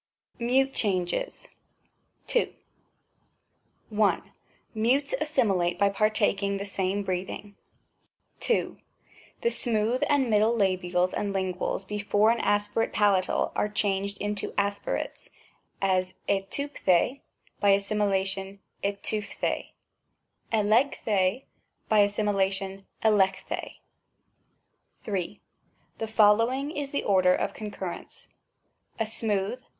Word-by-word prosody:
MUTE 265 +3 +2
CHANGES. 195 - -1 0.8
2. 485 - +1 1.5
I. 205 - +3 0.5
Mutes 250 - +1
assimilate 195 - +1
by 200 +1 +4
partaking 200 -1 +1
the 200 - -4
same 200 0 -1
breathing. 190 +2 -4 0.9
II. 470 - +1 0.6
The 470 - +2
smooth 230 - +1
and 285 -3 +3
middle 215 +1 +3
labials 185 -2 +1
and 200 -1 -2
Unguals 190 0 -2
before 210 +1 +2
an 235 - 0
aspirate 205 +2 +1
palatal 200 -3 +2
are 210 - +1
changed 200 -1 -1
into 205 0 -3
aspirates, 200 0 -2 0.5
as 185 -1 +1
irvTv 200 +9 -2
d 185 - +4
rj 245 +10 +2 0.4
by 200 - +3
assimilation 195 -1 +1 0.3
hytp 200 0 -2
d^riy 210 -2 -2 0.8
iXsy 225 +5 +3
^i] 200 +3 +1 0.5
by 215 - +5
assimilation 195 -1 0 0.2
iXex 195 -3 +3 1.6
O^n* 210 - -3
ni. 195 +2 -3 0.6
The 225 - -2
following 230 +6 +3
is 290 -3 -3
the 280 - -2
order 185 -2 +4
of - - -2
concurrence: 200 -4 -7 0.7
a 225 - +1
smooth 215 +1 -2
205 Hz, 105 wpm, -27 LUFS, 195-220 Hz, 1.6 s, by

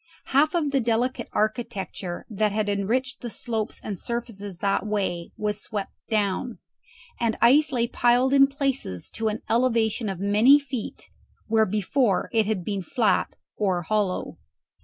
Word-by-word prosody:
Half 305 +5 +4
of 305 -4 +1
the 275 - +2
delicate 240 +1 0
architecture 205 -5 -3
that 215 -1 0
had 210 0 -1
enriched 240 +7 -1
the 240 - -4
slopes 220 -2 -3
and 200 -4 -5
surfaces 210 -5 -5
that 195 +2 0
way 195 -5 -2
was 210 0 -2
swept 205 -3 -5 0.2
down, 215 +2 0 0.6
and 230 -2 0
ice 280 +6 +5
lay 235 -3 +1
piled 245 +3 +3
in 275 0 +7
places 275 - -3
to 225 -1 -2
an 215 +1 -2
elevation 230 -2 +1
of 190 -3 -4
many 210 +8 +6
feet, 265 -5 -6 0.4
where 220 0 +3
before 210 +2 +1
it 220 -2 +3
had 200 -5 -1
been 200 -2 -2
flat 200 +2 +1 0.2
or 185 -4 0
hollow. 205 0 -1
220 Hz, 150 wpm, -25 LUFS, 200-250 Hz, 0.6 s, in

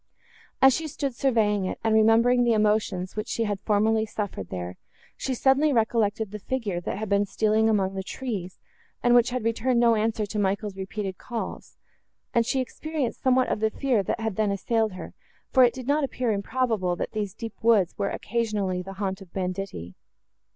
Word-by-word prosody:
As 265 0 +8
she 320 -1 -3
stood 280 -3 -3
surveying 220 -6 +1
it, - - -3
and 225 -1 +2
remembering 230 +3 +5
the 235 -1 +3
emotions, 210 -4 +1
which 215 +1 -3
she 230 - -1
had 205 -3 -2
formerly 220 +2 +2
suffered 200 - -5
there, 90 0 -5 0.4
she 265 - -3
suddenly 270 +4 +3
recollected 220 -3 +1
the 210 - -6
figure, 210 -6 -3
that 175 - -4
had 215 +1 -4
been 200 0 +3
seen - - -20
stealing 220 0 +3
among 195 -3 +1
the 190 - -3
trees, 195 -4 -5 0.5
and 245 - +4
which 240 -1 +5
had 250 -2 -3
returned 230 +2 +1
no 235 -1 +5
answer 220 0 0
to 210 +1 -4
Michael's 200 0 -1
repeated 195 0 -5
calls; 235 -2 -6 0.6
and 230 -1 +2
she 265 - +1
experienced 295 0 -4
somewhat 260 -1 +3
of - - -1
the 220 0 +2
fear, 245 -1 +1
that 195 - -2
had 220 -4 -3
then 215 -1 +2
assailed 220 +2 0
her, 185 - -8 0.4
for 260 - +6
it 245 - +5
did 255 -2 -7
not 290 +3 +2
appear 255 -3 -1
improbable, 210 -3 0
that - - -4
these 205 -3 -3
deep 225 -2 -6
woods 215 -6 +4
were 200 - 0
occasionally 210 -5 -1
the 195 +2 -8
haunt 195 0 -3
of 185 -3 -13
banditti. 185 - -4
220 Hz, 195 wpm, -26 LUFS, 195-240 Hz, 0.6 s, As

